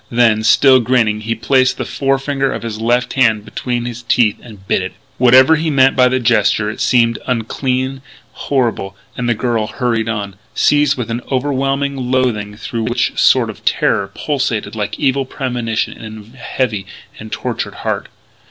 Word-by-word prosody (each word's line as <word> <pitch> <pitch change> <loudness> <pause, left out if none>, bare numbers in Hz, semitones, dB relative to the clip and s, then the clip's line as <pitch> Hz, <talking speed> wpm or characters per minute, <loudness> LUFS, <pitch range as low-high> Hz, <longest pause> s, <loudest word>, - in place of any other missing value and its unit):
Then, 115 -2 +3
still 130 +3 +5
grinning, 115 -3 +1
he 115 +1 -2
placed 130 +3 +2
the - - -3
forefinger 135 0 -1
of - - -5
his 110 -2 -5
left 120 +2 +1
hand 110 -5 +2
between 120 +2 -3
his 120 -1 -6
teeth 120 -2 +2
and 105 -5 -14
bit - - +1
it. - - -5 0.3
Whatever 130 +5 +6
he 160 +1 -1
meant 135 -2 +4
by 125 -1 +5
the 130 +1 +1
gesture 115 -3 +2
it - - -8
seemed 115 -2 +2
unclean, 130 +2 -2 0.3
horrible; 115 -8 -2 0.2
and 120 -1 -2
the 120 - +2
girl 115 -2 -1
hurried 115 -1 -1
on, 100 -4 -4 0.2
seized 145 -1 +3
with 120 -2 -4
an 120 +2 -2
overwhelming 135 +1 -1
loathing 110 -5 0
through 115 0 -4
which 120 +1 0
a - - -21
sort - - +4
of - - -17
terror 100 -1 +1
pulsated 135 -8 -2
like 105 -1 -3
evil 135 -1 +1
premonition 125 -4 -3
in 110 0 -11
a - - -18
heavy 110 -6 -2 0.3
and - - -9
tortured - - -4
heart. - - -2
120 Hz, 170 wpm, -16 LUFS, 110-130 Hz, 0.3 s, Whatever